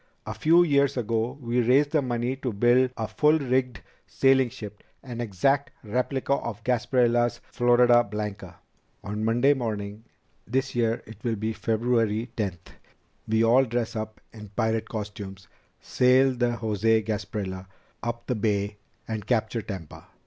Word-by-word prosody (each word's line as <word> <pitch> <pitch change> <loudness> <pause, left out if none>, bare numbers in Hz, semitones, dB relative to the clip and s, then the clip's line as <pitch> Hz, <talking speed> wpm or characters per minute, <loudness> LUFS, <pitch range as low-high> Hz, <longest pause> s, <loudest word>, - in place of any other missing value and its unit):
A - - -4
few 170 +2 +4
years 140 -4 +2
ago 115 +2 -1
we 120 -1 0
raised 135 +5 +3
the 155 - +3
money 120 0 -1
to 130 -2 -3
build 120 +5 +3
a 110 - -2
full 150 +8 +3
rigged 130 -5 -1 0.3
sailing 135 -2 +3
ship, 105 -2 -9 0.2
an 120 -3 -6
exact 135 +7 +1
replica 125 +5 -1
of 115 -5 -4
Gasparilla's 120 0 +2
Florida 120 0 +5
Blanca. 100 -4 -6 0.5
On 105 +2 -4
Monday 120 +5 +3
morning 105 -4 -4 0.4
this 130 +4 -1
year 115 -1 0
it 110 -1 -13
will 115 -2 0
be 110 +2 -2
February 115 0 0
tenth 95 -6 -4 0.6
we 110 +1 +2
all 120 +4 +5
dress 120 -1 -2
up 110 0 -5
in 105 -2 -10
pirate 110 -1 0
costumes, 100 -3 -7 0.3
sail 130 +1 +3
the 120 -1 0
José 110 0 +1
Gasparilla 100 -3 -4 0.3
up 120 0 -4
the 125 - -1
Bay, 105 -2 -1 0.3
and 110 -2 -5
capture 115 -1 0
Tampa. 95 -7 -8
115 Hz, 145 wpm, -26 LUFS, 105-125 Hz, 0.6 s, Florida